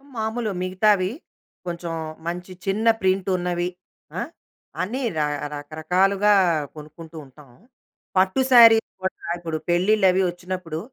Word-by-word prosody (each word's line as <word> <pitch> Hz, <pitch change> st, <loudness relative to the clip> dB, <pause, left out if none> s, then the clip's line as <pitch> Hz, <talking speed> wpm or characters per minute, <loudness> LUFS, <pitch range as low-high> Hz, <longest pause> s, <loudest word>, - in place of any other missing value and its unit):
మాములు 220 Hz, 0 st, -2 dB
మిగతావి 185 Hz, +1 st, +2 dB, 0.5 s
కొంచుం 170 Hz, -1 st, -5 dB, 0.3 s
మంచి 180 Hz, +2 st, -5 dB
చిన్న 205 Hz, +4 st, 0 dB
ప్రింటున్నవి, 185 Hz, -2 st, 0 dB, 0.5 s
ఆ! -, -, -1 dB, 0.6 s
అన్నీ 235 Hz, +9 st, -3 dB, 0.2 s
రా 150 Hz, -, +2 dB, 0.3 s
రకరకాలుగా 180 Hz, +8 st, +1 dB, 0.4 s
కొనుక్కుంటూ 155 Hz, +2 st, -11 dB
ఉంటాం. 140 Hz, +1 st, -17 dB, 0.7 s
పట్టు 190 Hz, +7 st, +3 dB
శారీస్ 230 Hz, -2 st, +7 dB
కూడా 190 Hz, -, -4 dB
ఇప్పుడు 165 Hz, -2 st, -4 dB
పెళ్ళిళ్ళవి 190 Hz, +1 st, +3 dB
ఒచ్చినప్పుడు, 175 Hz, -2 st, -5 dB
185 Hz, 100 wpm, -23 LUFS, 170-200 Hz, 0.7 s, శారీస్